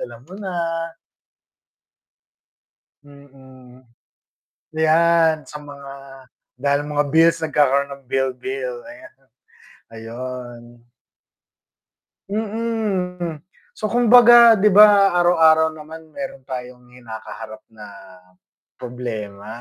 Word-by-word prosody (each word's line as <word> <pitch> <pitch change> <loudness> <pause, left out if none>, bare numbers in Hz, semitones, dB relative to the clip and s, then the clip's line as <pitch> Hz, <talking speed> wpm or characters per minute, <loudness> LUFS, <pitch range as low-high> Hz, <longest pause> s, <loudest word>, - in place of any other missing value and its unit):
alam 120 0 -9
mo 175 - -17
na. 190 -2 -6 2.5
Mm. 130 -3 -18 0.9
Yan 160 0 +2
sa 150 - -10
mga 140 -1 -11 0.7
dahil 140 +2 0
mga 145 0 -2
bills 165 +1 +4
nagkakaroon 140 -2 +1
ng 140 -1 -16
bill-bill, 130 -1 -3
ayan. 320 +2 -14 0.8
Ayun. 120 +1 -8 1.7
Mm. 200 -6 -3 0.3
So, 215 - -4
kumbaga 240 -1 +6
'di 210 - +4
ba, 200 -1 +6
araw-araw 160 -2 +4
naman 155 +1 -12
meron 175 -7 -8
tayong 125 -1 -9
kinakaharap 110 -3 -10
na 110 -1 -12 0.9
problema? 110 -5 -7
150 Hz, 85 wpm, -20 LUFS, 125-180 Hz, 2.5 s, kumbaga